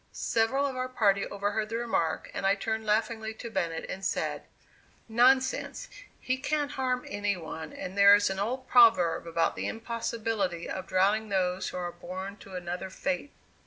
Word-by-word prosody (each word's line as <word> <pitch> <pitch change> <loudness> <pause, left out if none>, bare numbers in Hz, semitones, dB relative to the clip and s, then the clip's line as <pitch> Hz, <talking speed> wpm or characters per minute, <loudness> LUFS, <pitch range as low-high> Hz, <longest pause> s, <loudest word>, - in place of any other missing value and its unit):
Several 240 +5 +1
of 270 -2 -2
our 255 0 -2
party 200 -5 +2
overheard 205 +2 -2
the 225 - -2
remark 225 -9 -1
and - - -4
I 195 +1 +4
turned 220 +2 -3
laughingly 220 +1 0
to 235 +1 -8
Bennett 165 -5 -2
and 190 - -6
said: - - -1 0.7
"Nonsense; 260 - +2 0.3
he 255 +1 -1
can't 290 +2 -1
harm 255 -1 -1
any 205 -1 -1
one 160 -1 -7
and 185 - -7
there 200 0 +8
is 205 -1 +2
an 190 - -3
old 255 +6 -2
proverb 225 -10 +5
about 165 0 +1
the - - -3
impossibility 225 -5 -2
of 190 0 -5
drowning 205 +4 +2
those 185 -1 0
who - - -6
are 175 -1 -3
born 190 +3 -7
to 195 -2 -11
another 180 +1 -4
fate." 280 +7 -3
210 Hz, 170 wpm, -29 LUFS, 185-235 Hz, 0.7 s, there